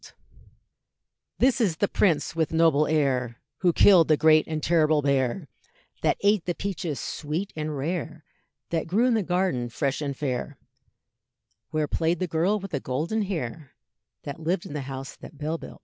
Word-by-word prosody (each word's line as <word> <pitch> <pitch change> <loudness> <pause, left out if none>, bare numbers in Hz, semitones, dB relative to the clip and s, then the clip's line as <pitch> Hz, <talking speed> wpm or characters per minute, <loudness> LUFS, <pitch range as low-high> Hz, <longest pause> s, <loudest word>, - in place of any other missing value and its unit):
This 260 0 +3
is 180 -8 +1
the 200 - +1
prince 165 -7 +1
with 160 -2 0
noble 160 -2 +3
air, 130 -6 0 0.2
Who 180 -2 +3
killed 175 -1 +6
the 155 - +4
great 155 0 +5
and 155 -2 -3
terrible 155 -3 +3
bear, 140 +3 0 0.5
That - - +2
ate 200 -2 +2
the 175 - -2
peaches 175 -7 -4
sweet 160 +6 -4
and 155 -1 -3
rare, 160 +1 -4 0.5
That 165 -2 -1
grew 210 +8 +2
in 250 - +3
the 220 - +2
garden 180 -9 0
fresh 135 +4 -2
and 140 -2 -3
fair, 140 0 -3 1.1
Where 155 -1 -1
played 165 +4 0
the 185 - -1
girl 175 +5 +1
with 195 -1 -8
the 140 - -1
golden 155 +13 -2
hair, 160 - -4 0.5
That 140 +1 -6
lived 170 +3 -1
in - - -8
the 150 - -3
house 135 0 -6
that 150 - -12
Bell 155 +3 -3
built. - - -11
160 Hz, 170 wpm, -26 LUFS, 145-180 Hz, 1.1 s, killed